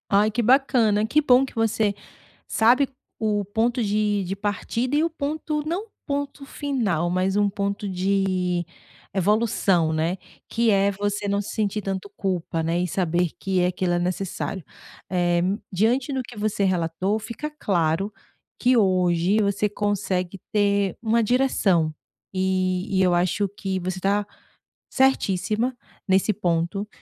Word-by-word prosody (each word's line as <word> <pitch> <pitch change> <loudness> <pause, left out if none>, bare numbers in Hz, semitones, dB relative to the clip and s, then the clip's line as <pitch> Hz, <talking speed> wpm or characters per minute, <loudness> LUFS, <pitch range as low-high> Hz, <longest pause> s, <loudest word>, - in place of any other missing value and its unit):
Ai 205 +2 +3
que 235 +3 0
bacana, 235 -4 +3
que 300 +7 +3
bom 260 -2 +5
que 265 - -13
você 220 -2 +1 0.5
sabe 250 +5 +4 0.3
o 210 -2 0
ponto 230 +4 0
de 210 -1 +1
de 190 +2 -3
partida 210 +6 -2
e 300 - +3
o 335 - +1
ponto, 305 0 -3
não 370 +7 -2 0.2
ponto 280 0 -3
final, 235 - -1
mas 185 +2 0
um 205 -1 +3
ponto 200 +1 -3
de 185 -2 0 0.5
evolução, 195 -4 +2
né. 165 +4 0 0.3
Que 235 0 +1
é 200 0 +3
você 205 +1 -2
não 200 0 +1
se 205 - -7
sentir 210 -1 0
tanto 195 0 -4
culpa, 175 -4 -2
né, 165 +2 0
e 180 - 0
saber 175 0 0
que 190 -2 0
aquilo 180 0 0
é 175 - +1
necessário. 185 +1 -3 0.5
Eh, 175 -1 +2 0.3
diante 235 +8 +1
do 265 - -1
que 240 -1 -12
você 210 -1 -1
relatou, 185 +2 0
fica 235 +7 -6
claro 195 - 0 0.5
que 250 +1 +4
hoje 185 -1 +3
você 200 +1 +1
consegue 195 -3 -2
ter 200 -2 +1
uma 230 0 +2
direção. 205 -10 +2 0.4
E 185 +1 0
e - - +4
eu 180 -1 +3
acho 180 +3 +1
que 190 -2 -2
você 185 +1 -4
tá 200 +2 +1 0.7
certíssima 240 -2 +1 0.3
nesse 190 +2 +3
ponto 180 +1 -1
200 Hz, 145 wpm, -24 LUFS, 185-225 Hz, 0.7 s, bom